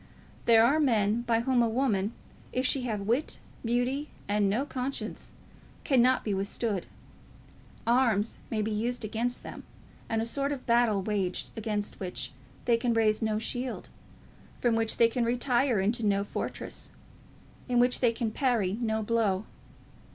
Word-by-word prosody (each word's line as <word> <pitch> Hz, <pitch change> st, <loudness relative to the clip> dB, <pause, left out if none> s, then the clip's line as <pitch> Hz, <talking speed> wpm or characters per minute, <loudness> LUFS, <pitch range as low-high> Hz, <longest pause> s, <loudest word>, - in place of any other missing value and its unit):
There 225 Hz, -1 st, +7 dB
are 285 Hz, +6 st, +3 dB
men 225 Hz, -5 st, +2 dB
by 230 Hz, -1 st, +1 dB
whom 250 Hz, 0 st, +2 dB
a 230 Hz, -, +3 dB
woman, 220 Hz, -4 st, 0 dB, 0.4 s
if 255 Hz, +1 st, 0 dB
she 260 Hz, +1 st, +2 dB
have 215 Hz, -4 st, -2 dB
wit, 235 Hz, +9 st, 0 dB, 0.3 s
beauty, 245 Hz, +5 st, 0 dB, 0.2 s
and 205 Hz, 0 st, +2 dB
no 235 Hz, +8 st, 0 dB
conscience, 265 Hz, -1 st, -4 dB, 0.5 s
cannot 255 Hz, -2 st, +4 dB
be 210 Hz, -, -1 dB
withstood. 200 Hz, 0 st, -2 dB, 1.0 s
Arms 230 Hz, -3 st, +2 dB
may 215 Hz, -2 st, 0 dB
be 220 Hz, -, -2 dB
used 230 Hz, +2 st, -1 dB
against 235 Hz, +3 st, -2 dB
them, -, -, -8 dB, 0.5 s
and 225 Hz, -, 0 dB
a 225 Hz, -, 0 dB
sort 275 Hz, +4 st, -1 dB
of 275 Hz, -3 st, -5 dB
battle 235 Hz, -4 st, +3 dB
waged, 195 Hz, -3 st, -2 dB
against 210 Hz, -2 st, -3 dB
which 185 Hz, -2 st, -4 dB, 0.3 s
they 235 Hz, -1 st, +4 dB
can 235 Hz, 0 st, 0 dB
raise 215 Hz, -1 st, +3 dB
no 220 Hz, -1 st, +1 dB
shield, 245 Hz, +3 st, -4 dB, 0.7 s
from 240 Hz, -2 st, +2 dB
which 225 Hz, -1 st, +1 dB
they 230 Hz, -, +6 dB
can 235 Hz, +1 st, -1 dB
retire 245 Hz, 0 st, +2 dB
into 220 Hz, +5 st, +1 dB
no 200 Hz, -1 st, +2 dB
fortress, 205 Hz, -, -5 dB, 0.8 s
in 245 Hz, -, +2 dB
which 245 Hz, +1 st, +4 dB
they 240 Hz, -3 st, +4 dB
can 230 Hz, -1 st, -2 dB
parry 225 Hz, -6 st, +1 dB
no 220 Hz, -1 st, 0 dB
blow. 210 Hz, -3 st, +1 dB
230 Hz, 155 wpm, -29 LUFS, 215-245 Hz, 1.0 s, There